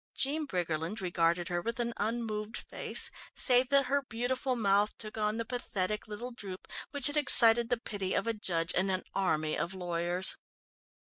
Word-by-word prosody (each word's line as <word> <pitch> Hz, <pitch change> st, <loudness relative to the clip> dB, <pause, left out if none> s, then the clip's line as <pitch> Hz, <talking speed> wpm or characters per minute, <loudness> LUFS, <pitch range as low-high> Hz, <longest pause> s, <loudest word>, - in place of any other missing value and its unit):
Jean 295 Hz, +3 st, -1 dB
Briggerland 170 Hz, -, -3 dB
regarded 175 Hz, -1 st, 0 dB
her 175 Hz, -1 st, -2 dB
with 230 Hz, +5 st, -4 dB
an 235 Hz, 0 st, -2 dB
unmoved 220 Hz, 0 st, -3 dB
face -, -, 0 dB, 0.2 s
save 250 Hz, -1 st, +3 dB
that 275 Hz, -1 st, +4 dB
her 280 Hz, +2 st, 0 dB
beautiful 255 Hz, +1 st, -3 dB
mouth 205 Hz, -2 st, +1 dB
took 215 Hz, -1 st, -9 dB
on 215 Hz, 0 st, -1 dB
the 230 Hz, -, -3 dB
pathetic 215 Hz, -4 st, -3 dB
little 225 Hz, +4 st, -7 dB
droop 195 Hz, -6 st, -9 dB, 0.2 s
which 285 Hz, -2 st, +1 dB
had 290 Hz, +1 st, +6 dB
excited 235 Hz, -5 st, +7 dB
the 245 Hz, -, +1 dB
pity 200 Hz, -4 st, -4 dB
of -, -, -1 dB
a 230 Hz, -, 0 dB
judge 175 Hz, -5 st, +1 dB
and 190 Hz, +2 st, 0 dB
an 185 Hz, -1 st, -2 dB
army 155 Hz, -5 st, -1 dB
of 170 Hz, +4 st, -4 dB
lawyers. 175 Hz, 0 st, +2 dB
215 Hz, 175 wpm, -30 LUFS, 185-240 Hz, 0.2 s, excited